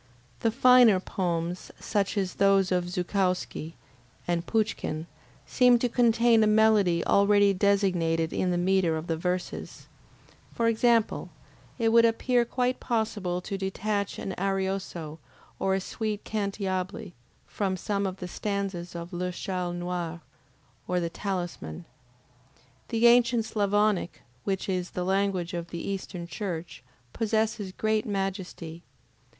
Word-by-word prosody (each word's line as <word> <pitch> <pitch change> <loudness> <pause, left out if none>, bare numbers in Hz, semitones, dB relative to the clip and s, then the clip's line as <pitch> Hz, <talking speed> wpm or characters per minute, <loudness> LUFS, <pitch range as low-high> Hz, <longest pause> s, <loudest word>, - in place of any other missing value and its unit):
The 225 - +2
finer 245 -3 +6
poems, 175 -2 -3
such 205 0 -1
as 190 -2 0
those 195 -1 +4
of 180 -1 0
Zukowski 180 -3 -1 0.5
and 170 0 -1
Pouchkin, 210 -8 -1 0.4
seem 250 -1 +5
to 245 - 0
contain 235 -1 +4
a - - +4
melody 210 -5 +4
already 200 0 +4
designated 185 -5 +1
in 185 - 0
the 175 - +1
metre 180 -2 +2
of 155 - -5
the 165 - -1
verses; 180 +2 -4 0.7
for 230 - +1
example, 230 0 +2 0.5
it 230 -2 +2
would 230 +1 +6
appear 235 +1 +2
quite 250 +1 -1
possible 205 -6 -1
to 195 +1 -5
detach 200 +1 -2
an 190 - -4
ARIOSO 190 -5 -2 0.4
or 190 0 +1
a - - 0
sweet 215 +1 -4
CANTIABLE 200 -1 -3 0.3
from 190 -2 -2
some 200 +1 -1
of 190 0 -5
the 180 - -6
stanzas 195 -3 -3
of 170 +2 -7
LE 180 +1 -2
CHALE 180 -1 -3
NOIR, 175 -1 -4 0.7
or 180 0 +1
the 170 -1 -2
TALISMAN. 175 - -4 1.0
The 230 0 +1
ancient 235 -1 +5
Sclavonic, 205 -3 0 0.2
which 195 -1 -1
is 180 -2 -1
the 180 - -3
language 190 -2 0
of 170 -1 -4
the 170 - -5
Eastern 190 -3 -4
Church, 170 - -5 0.3
possesses 220 -2 -1
great 215 +2 0
majesty. 190 -4 -4
195 Hz, 130 wpm, -27 LUFS, 180-215 Hz, 1.0 s, finer